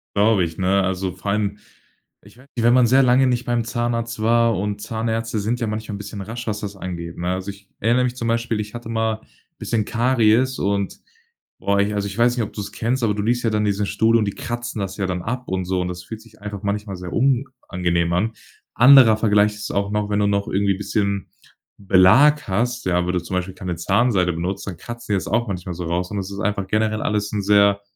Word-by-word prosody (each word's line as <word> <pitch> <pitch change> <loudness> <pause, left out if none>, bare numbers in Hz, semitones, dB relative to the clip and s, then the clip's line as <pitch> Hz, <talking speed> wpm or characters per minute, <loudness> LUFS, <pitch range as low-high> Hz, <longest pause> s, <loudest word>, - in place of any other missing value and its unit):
Glaube 105 -2 +4
ich, 80 -1 -4
ne? 95 +1 +2
Also, 95 0 -1
vor 100 - -4
allem 105 0 -1 0.7
ich 100 +4 -18
weiß 130 - -17
nicht, 115 - -1
wenn 120 - +6
man 125 -1 +5
sehr 130 +3 +5
lange 130 +1 +4
nicht 125 -1 0
beim 120 -1 0
Zahnarzt 115 -1 -2
war 115 0 +3
und 105 +1 -2
Zahnärzte 115 0 -2
sind 115 +4 -1
ja 115 - -1
manchmal 110 -1 -4
'n - - -5
bisschen 100 0 -7
rasch, 115 +4 -6
was 105 -1 -2
das 100 -1 -5
angeht, 85 -3 -6
ne? 90 +1 -2
Also, 95 +2 -4
ich 100 0 -18
erinner 120 +4 +2
mich 125 0 -1
zum 115 -2 -3
Beispiel, 115 -1 0
ich 105 +1 -5
hatte 120 -1 -7
mal 110 -1 -1 0.4
bisschen 110 -3 -1
Karies 120 +1 +2
und 100 0 -1 0.6
boah, 100 0 +1
ich 105 +1 +1
also 100 0 -1
ich 100 +2 -7
weiß 120 +1 +3
nicht, 115 - +1
ob - - -11
du's 105 -2 -6
kennst, 120 +3 -1
aber 110 -2 +2
du 105 - -2
liegst 120 +2 0
ja 115 - +2
dann 105 0 +1
in - - +1
diesem 100 0 0
Stuhl 115 +1 +3
und 110 - +1
die 100 - -1
kratzen 120 -2 -5
das 95 0 -4
ja 100 - -1
dann 90 -1 -2
ab 125 +4 -4
und 95 -1 -2
so. 90 0 -1
Und 90 - -2
das 90 0 -7
fühlt 110 +4 -8
sich 115 - -20
einfach 105 -1 -6
manchmal 100 -1 -2
sehr 90 -1 -7
unangenehm 115 -10 0
an. 110 +6 0 0.4
Anderer 125 -2 +7
Vergleich 105 -1 +3
ist 105 - -6
auch 100 0 -1
noch, 105 0 -1
wenn 105 0 +1
du 105 - +2
noch 100 0 0
irgendwie 100 0 +1
bisschen 100 -1 -2 0.5
Belag 105 +11 +5
hast, 120 +5 -1
ja, 90 -1 +1
wenn 90 - -1
du 90 - +1
zum 95 - -4
Beispiel 90 +1 -3
keine 90 -2 -4
Zahnseide 95 -1 +2
benutzt, 95 +4 -4
dann 90 - -5
kratzen 120 +2 -6
die 100 - +3
das - - -4
auch 120 +2 0
manchmal 90 -2 -4
so 90 0 -5
raus. 90 +3 -2
Und 105 - -3
das 95 0 -4
ist 100 - -6
einfach 100 -2 -1
generell 110 +1 0
alles 105 -1 -1
'n 105 - 0
sehr 100 0 +4
105 Hz, 240 wpm, -21 LUFS, 95-115 Hz, 0.7 s, Anderer